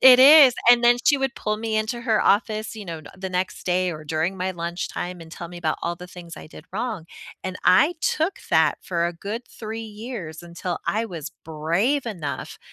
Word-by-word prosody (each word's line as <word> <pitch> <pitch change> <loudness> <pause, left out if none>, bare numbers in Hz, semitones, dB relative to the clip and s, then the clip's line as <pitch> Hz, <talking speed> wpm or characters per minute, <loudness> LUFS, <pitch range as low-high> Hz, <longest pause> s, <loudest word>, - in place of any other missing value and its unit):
It 255 -1 +9
is, 280 -2 +9 0.2
and 240 0 +6
then 240 0 +7
she 285 -2 +5
would 270 -1 -1
pull 215 0 -2
me 220 0 -2
into 220 +3 -1
her 225 -3 +2
office, 215 +1 +1
you 210 - -7
know, 165 -2 -6
n 150 - -13
the 190 0 -4
next 180 +1 -2
day 180 0 +1
or 155 -2 -7
during 160 +5 -1
my 185 0 -2
lunchtime 175 +1 -4
and 165 - -11
tell 170 - -7
me 175 0 -9
about 160 -2 -1
all 170 0 -2
the 180 - -10
things 175 -2 -11
I - - -10
did - - -13
wrong, 215 -5 -3 0.4
and 185 0 -4
I 210 - +5
took 320 +6 0
that - - +4
for 170 -2 -1
a 175 - -3
good 205 +7 -5
3 225 0 -6
years 210 - -7
until 175 +1 -5
I 220 +2 +1
was 170 -9 -7
brave 170 - 0
enough 150 -11 -5
190 Hz, 210 wpm, -24 LUFS, 170-230 Hz, 0.4 s, It